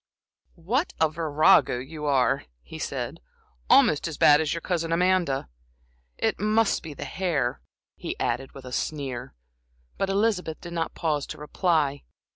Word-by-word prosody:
"What 230 Hz, -, -1 dB
a 160 Hz, -, +4 dB
virago 155 Hz, -4 st, +4 dB
you 150 Hz, +4 st, -7 dB
are!" 135 Hz, -1 st, +2 dB, 0.2 s
he 65 Hz, -, -10 dB
said, -, -, -4 dB, 0.5 s
"almost 150 Hz, +2 st, +5 dB
as 160 Hz, -3 st, -6 dB
bad 150 Hz, +1 st, +6 dB
as 155 Hz, -, -1 dB
your 165 Hz, -, -2 dB
cousin 165 Hz, -2 st, -2 dB
Amanda. 175 Hz, -, +1 dB, 0.7 s
It -, -, 0 dB
must 215 Hz, +1 st, +2 dB
be 155 Hz, -3 st, -8 dB
the -, -, -6 dB
hair," 155 Hz, -10 st, -1 dB, 0.4 s
he -, -, -5 dB
added, 135 Hz, +1 st, -2 dB
with 135 Hz, -2 st, -11 dB
a 125 Hz, -, -8 dB
sneer, 135 Hz, -, -4 dB, 0.6 s
but 195 Hz, -, 0 dB
Elizabeth 195 Hz, -5 st, 0 dB
did 170 Hz, -1 st, -9 dB
not 165 Hz, -1 st, -2 dB
pause 150 Hz, -4 st, -1 dB
to -, -, -7 dB
reply. 150 Hz, -2 st, 0 dB
160 Hz, 150 wpm, -26 LUFS, 140-180 Hz, 0.7 s, bad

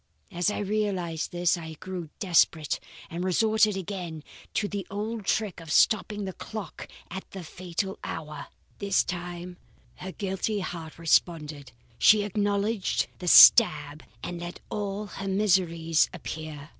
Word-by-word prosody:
As 175 Hz, +1 st, +1 dB
I 210 Hz, -, -3 dB
realized 195 Hz, -6 st, -2 dB
this, 175 Hz, 0 st, +2 dB
I 160 Hz, -2 st, -7 dB
grew 175 Hz, 0 st, -7 dB
desperate 165 Hz, -4 st, +2 dB, 0.3 s
and 170 Hz, +2 st, -3 dB
resorted 215 Hz, +2 st, +3 dB
again 180 Hz, -5 st, -5 dB, 0.3 s
to 205 Hz, -, +1 dB
the 200 Hz, -3 st, -5 dB
old 215 Hz, +1 st, -4 dB
trick 205 Hz, -3 st, 0 dB
of 165 Hz, -2 st, -9 dB
stopping 210 Hz, +3 st, +3 dB
the 190 Hz, -, -5 dB
clock 215 Hz, -1 st, -7 dB, 0.2 s
at 190 Hz, +2 st, -7 dB
the 190 Hz, -2 st, -8 dB
fatal 185 Hz, +3 st, -4 dB
hour. 150 Hz, -2 st, -6 dB, 0.3 s
This 200 Hz, -1 st, +2 dB
time 175 Hz, 0 st, -6 dB, 0.4 s
her 190 Hz, -, -7 dB
guilty 195 Hz, +2 st, -2 dB
heart 165 Hz, -4 st, -6 dB
responded. 155 Hz, -3 st, 0 dB, 0.3 s
She 210 Hz, -1 st, +6 dB
acknowledged 205 Hz, 0 st, 0 dB
the 180 Hz, -, -6 dB
stab 155 Hz, -8 st, +7 dB, 0.2 s
and 175 Hz, -1 st, -5 dB
let 175 Hz, 0 st, -7 dB
all 205 Hz, 0 st, -3 dB
her 195 Hz, 0 st, -7 dB
miseries 175 Hz, -5 st, +2 dB
appear. 155 Hz, -3 st, -7 dB
185 Hz, 135 wpm, -27 LUFS, 165-205 Hz, 0.4 s, stab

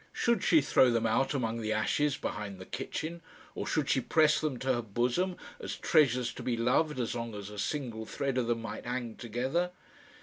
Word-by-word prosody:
Should 235 Hz, -4 st, +1 dB
she 160 Hz, -3 st, +5 dB
throw 130 Hz, -2 st, +5 dB
them 115 Hz, -1 st, +1 dB
out 135 Hz, +6 st, +2 dB
among 115 Hz, -3 st, -1 dB
the 110 Hz, 0 st, -2 dB
ashes 145 Hz, +7 st, +1 dB
behind 105 Hz, -7 st, -4 dB
the 95 Hz, -, -9 dB
kitchen, 165 Hz, -, -4 dB, 0.3 s
or -, -, -4 dB
should 150 Hz, -3 st, 0 dB
she 135 Hz, -, +2 dB
press 155 Hz, +3 st, +3 dB
them 150 Hz, -5 st, -1 dB
to 130 Hz, +1 st, +1 dB
her 120 Hz, -, 0 dB
bosom 120 Hz, -, 0 dB, 0.2 s
as -, -, -4 dB
treasures 130 Hz, -6 st, +3 dB
to -, -, -8 dB
be 120 Hz, -2 st, -1 dB
loved 130 Hz, +5 st, +2 dB
as 120 Hz, -, -1 dB
long 115 Hz, -2 st, -4 dB
as 100 Hz, 0 st, -7 dB
a 105 Hz, -, -7 dB
single 115 Hz, -3 st, -3 dB
thread 135 Hz, -2 st, -1 dB
of 120 Hz, -, -1 dB
them 115 Hz, -1 st, 0 dB
might 115 Hz, -, -6 dB
hang 120 Hz, -2 st, -3 dB
together? 130 Hz, +10 st, -1 dB
125 Hz, 205 wpm, -31 LUFS, 115-150 Hz, 0.3 s, she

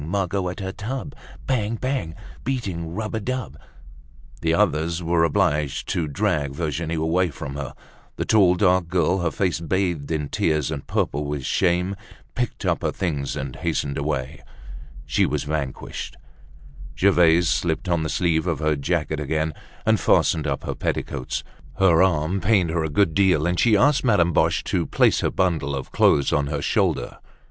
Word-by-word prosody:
Margot 95 Hz, +2 st, -1 dB
at 90 Hz, +3 st, -6 dB
her 95 Hz, 0 st, -3 dB
tub. 130 Hz, +8 st, -5 dB, 0.3 s
Bang! 115 Hz, -4 st, 0 dB
Bang! 130 Hz, -11 st, -3 dB, 0.3 s
Beating 90 Hz, -11 st, -3 dB
rub 110 Hz, +1 st, -4 dB
a 110 Hz, -, -1 dB
dub—" 125 Hz, -, -4 dB, 0.9 s
The 80 Hz, -, +1 dB
others 85 Hz, -2 st, +1 dB
were 85 Hz, 0 st, +2 dB
obliged 80 Hz, -6 st, +1 dB
to 85 Hz, -3 st, 0 dB
drag 70 Hz, 0 st, -1 dB
Virginie 80 Hz, 0 st, -2 dB
away 85 Hz, +3 st, +1 dB
from 70 Hz, -1 st, -7 dB
her. 70 Hz, -2 st, -6 dB, 0.4 s
The -, -, -3 dB
tall, 95 Hz, -5 st, +5 dB
dark 90 Hz, -2 st, +3 dB
girl, 90 Hz, +2 st, +1 dB
her 85 Hz, -2 st, 0 dB
face 90 Hz, 0 st, -1 dB
bathed 85 Hz, -3 st, -1 dB
in 75 Hz, -3 st, -2 dB
tears 75 Hz, -2 st, 0 dB
and 70 Hz, -3 st, -5 dB
purple 75 Hz, +1 st, -1 dB
with 70 Hz, -2 st, -4 dB
shame, 90 Hz, +2 st, +1 dB, 0.4 s
picked 125 Hz, -3 st, -3 dB
up -, -, +1 dB
her -, -, 0 dB
things 75 Hz, -7 st, -2 dB
and 65 Hz, -1 st, -5 dB
hastened 70 Hz, -1 st, -2 dB
away. 70 Hz, -1 st, -3 dB, 0.6 s
She -, -, +2 dB
was 75 Hz, 0 st, -1 dB
vanquished. 70 Hz, -3 st, -4 dB, 0.8 s
Gervaise 85 Hz, -2 st, +4 dB
slipped 85 Hz, +1 st, 0 dB
on 85 Hz, -2 st, +1 dB
the 80 Hz, -, -2 dB
sleeve 85 Hz, -1 st, +1 dB
of 85 Hz, -3 st, 0 dB
her 75 Hz, -1 st, +1 dB
jacket 75 Hz, +1 st, -1 dB
again, 80 Hz, +2 st, -1 dB, 0.3 s
and -, -, +3 dB
fastened 80 Hz, -2 st, +2 dB
up 70 Hz, -1 st, -2 dB
her -, -, -3 dB
petticoats. 65 Hz, -3 st, -3 dB, 0.3 s
Her 90 Hz, -3 st, +5 dB
arm 90 Hz, 0 st, +2 dB
pained 95 Hz, -5 st, +2 dB
her 85 Hz, -1 st, 0 dB
a 80 Hz, -, -2 dB
good 80 Hz, +2 st, +2 dB
deal, 90 Hz, -5 st, +3 dB
and 90 Hz, 0 st, 0 dB
she 110 Hz, -3 st, +4 dB
asked 140 Hz, +5 st, +3 dB
Madame 90 Hz, -9 st, +3 dB
Boche -, -, +2 dB
to -, -, -1 dB
place -, -, +3 dB
her -, -, +1 dB
bundle 80 Hz, -7 st, 0 dB
of 65 Hz, -, -6 dB
clothes 70 Hz, -, +3 dB
on 70 Hz, -1 st, +1 dB
her -, -, -3 dB
shoulder. -, -, 0 dB
85 Hz, 170 wpm, -23 LUFS, 75-95 Hz, 0.9 s, tall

